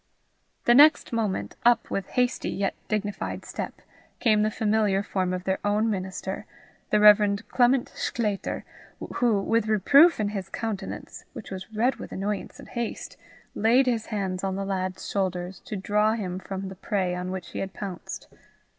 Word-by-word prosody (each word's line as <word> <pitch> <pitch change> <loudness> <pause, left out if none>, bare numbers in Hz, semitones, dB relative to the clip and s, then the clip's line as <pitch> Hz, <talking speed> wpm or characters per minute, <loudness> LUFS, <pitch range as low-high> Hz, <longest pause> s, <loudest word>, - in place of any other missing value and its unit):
The 240 - +6
next 290 0 +6
moment, 200 - -2
up, 240 0 +3
with 195 -2 -2
hasty 250 0 0
yet 195 -1 -1
dignified 210 -1 -3
step, - - -6 0.4
came 215 -3 +3
the 215 - +2
familiar 210 -2 +1
form 185 -3 -1
of 180 0 -3
their 190 0 0
own 210 +2 +2
minister, 190 +1 -4 0.4
the 210 - +3
Rev. 210 0 +6
Clement 245 +1 +3
Sclater, 210 -4 -2 0.5
who, 230 -4 +3
with 225 +2 +1
reproof 275 - +6
in 210 -1 +1
his 195 -2 -5
countenance, 220 -1 -5
which 235 -7 -9
was 190 +3 -7
red 235 +5 +1
with - - -9
annoyance 200 +1 -3
and - - -11
haste, 235 -2 -4 0.4
laid 240 +5 +4
his 235 -3 0
hands 195 -4 -3
on 190 -1 -1
the 195 0 -3
lad's 185 -1 -3
shoulders 185 -1 -2
to 215 - -5
draw 210 +2 +2
him 185 -5 -3
from 195 0 -5
the 190 - -9
prey 190 -2 -1
on 180 +1 -3
which 185 -3 -5
he - - -6
had 195 - -3
pounced. 190 -3 -7
205 Hz, 165 wpm, -26 LUFS, 190-225 Hz, 0.5 s, The